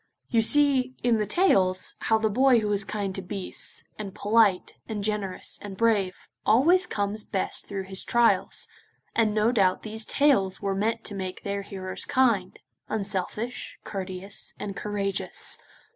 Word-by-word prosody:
You 230 -2 +3
see, 265 0 +5
in 235 -2 +3
the 210 - -1
tales, 190 - +3
how 220 - +2
the 220 0 +1
boy 250 +3 +4
who 210 -1 0
is 200 0 +2
kind 200 -1 -3
to 195 - -3
beasts, 190 0 -3 0.2
and 200 -2 -6
polite, 210 -3 +2 0.2
and 210 -2 -3
generous, 205 -3 -3
and 195 -2 -8
brave, 210 -5 +1 0.2
always 340 - +4
comes 205 - -2
best 195 - -2
through 195 -1 -4
his 190 0 -3
trials, 235 -1 +2 0.5
and 225 -2 +3
no 215 +2 +3
doubt 195 -6 +2
these 220 +1 -3
tales 235 -9 +2
were 200 -1 -1
meant 225 +4 -1
to 210 - -2
make 185 -2 -5
their 200 0 -2
hearers 190 -2 -5
kind, 230 -8 +1 0.3
unselfish, 215 +3 -3
courteous, 190 0 -5
and 200 -1 -5
courageous. 200 -1 -1
210 Hz, 155 wpm, -26 LUFS, 195-230 Hz, 0.5 s, see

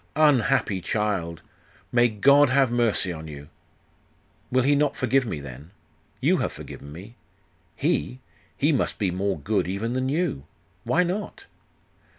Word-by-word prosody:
'Unhappy 135 -9 +3
child! 95 -6 -2 0.5
May 120 0 +4
God 140 +6 +5
have 135 -2 +3
mercy 115 -6 +1
on 80 -1 -8
you!' 70 -1 -10 1.0
'Will 130 0 +3
He 140 +3 +4
not 145 0 +1
forgive 130 0 +1
me, 80 - -3
then? 70 +2 -10 0.5
You - - +3
have - - -1
forgiven 70 - -10
me. 95 +10 -11 0.6
He? 60 +2 -1 0.4
He - - +2
must - - 0
be 95 -3 0
more 95 +1 -1
good 90 +3 -1
even 100 +6 -2
than 130 +1 -1
you. 145 - -1 0.4
Why 180 - +3
not? 190 +4 -4
110 Hz, 145 wpm, -25 LUFS, 85-135 Hz, 1.0 s, God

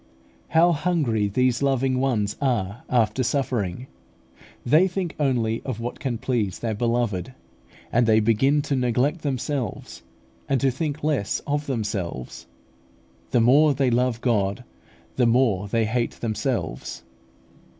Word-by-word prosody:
How 165 +2 +4
hungry 145 -10 0
these 125 +4 +1
loving 135 -2 +1
ones 110 -6 0
are 120 -4 -1
after 120 +1 +2
suffering! 125 -6 -1 0.8
They 155 +9 +5
think 180 -2 -3
only 120 -5 0
of 130 -4 -4
what 120 +1 -5
can 125 -4 -2
please 110 -6 -1
their 115 -2 -2
Beloved, 115 0 -1 0.6
and 120 0 +3
they 110 -1 +5
begin 135 +7 +2
to 140 - -1
neglect 130 +6 +1
themselves, 135 -2 -3 0.5
and 135 - +2
to 135 +1 +2
think 150 +2 -4
less 145 -10 0
of 145 +1 -2
themselves. 105 - -4 0.8
The 120 - +3
more 140 +5 +5
they 130 -1 +1
love 120 -1 +1
God, 105 -1 0 0.5
the 125 -2 +4
more 115 -5 +2
they 115 +2 +1
hate 120 +2 -1
themselves. 110 - -3
125 Hz, 130 wpm, -24 LUFS, 110-140 Hz, 0.8 s, They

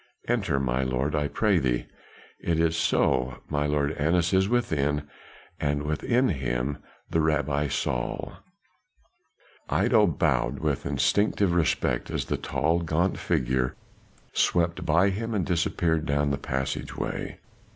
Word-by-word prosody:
"Enter, 100 - +1
my 65 -1 0
lord, 65 +3 -1
I 75 -1 +1
pray 100 +2 +2
thee. 60 -4 0 0.5
It 85 -1 0
is 80 0 +2
so, 65 -5 +1
my 75 -1 0
lord 75 0 +1
Annas 85 +4 +1
is 95 +1 +3
within, 75 - 0 0.5
and 75 -1 0
with 75 +1 -2
him 70 - 0 0.3
the 80 - +2
Rabbi 75 -2 +1
Saul." - - -2 1.4
Iddo - - +4
bowed - - +1
with - - -1
instinctive 100 -3 +2
respect 75 -7 +1
as - - -2
the - - -1
tall, 80 +3 0
gaunt 85 +2 0
figure 65 -5 0 0.6
swept 85 -1 +1
by 85 +6 +4
him 115 +3 -3
and 95 - 0
disappeared 85 -2 0
adown 70 0 +1
the 70 - -1
passageway. 65 0 -3
75 Hz, 130 wpm, -26 LUFS, 70-85 Hz, 1.4 s, Iddo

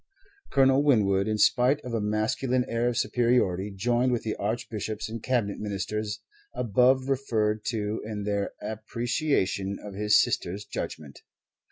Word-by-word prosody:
Colonel 135 0 +4
Winwood, 105 -8 +3
in 110 0 0
spite 125 +6 +4
of 125 -3 -7
a 115 - 0
masculine 120 +4 0
air 115 +1 0
of 120 - -3
superiority, 115 -6 +1
joined 120 +6 +1
with 120 - -1
the 110 - -2
Archbishops 110 0 -3
and 115 0 -6
Cabinet 115 -6 -1
Ministers 105 +1 -3 0.3
above 125 +3 +3
referred 110 -6 0
to 110 -1 -2
in 105 -1 -5
their 100 -1 -1
appreciation 110 - -1
of 105 - -9
his 105 +1 +4
sister's 100 +4 -1
judgment. 75 -3 -6
110 Hz, 140 wpm, -27 LUFS, 105-125 Hz, 0.3 s, Colonel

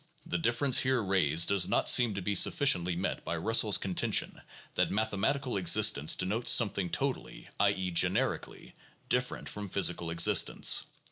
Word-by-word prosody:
The 90 - -4
difficulty 120 - +1
here 130 -3 -1
raised 85 -4 +1
does 100 -3 +2
not - - -1
seem 120 -5 +3
to 100 - -6
be 105 - -2
sufficiently 90 - +1
met 90 - -5
by - - -5
Russell's - - +2
contention - - -3 0.3
that - - -1
mathematical 110 +4 -2
existence 80 -5 +3
denotes 105 +6 -1
something 100 -5 +2
totally - - -5
(i. 100 - +3
e., 95 -2 -4
generically) 85 - -2 0.4
different 125 0 -2
from 105 -1 -6
physical 85 -1 -1
exist 85 0 +3
ence. - - +1
100 Hz, 150 wpm, -29 LUFS, 90-120 Hz, 0.4 s, seem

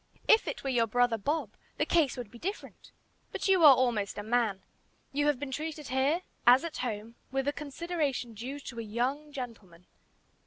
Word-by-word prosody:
If 445 - +5
it - - -4
were 270 - -1
your 230 -2 +2
brother 245 0 +2
Bob, 285 -1 -1 0.3
the 300 - +1
case 315 -6 +2
would 240 -4 -6
be 235 - -12
different. 395 - -6 0.4
But - - -2
you 380 -3 +4
are 285 -3 +10
almost 235 -6 0
a 205 - -4
man. 220 -3 0 0.5
You 290 +1 +1
have 295 -4 +2
been 285 -1 -5
treated 305 0 -5
here, 275 +7 +1 0.2
as 250 +2 +8
at 335 -2 -5
home, 225 -2 -4 0.2
with 270 0 -1
the 285 - 0
consideration 295 -5 -3
due 255 +7 -6
to 235 -4 -8
a - - -2
young 250 +7 -2
gentleman. 215 -10 -8
260 Hz, 190 wpm, -30 LUFS, 230-295 Hz, 0.5 s, are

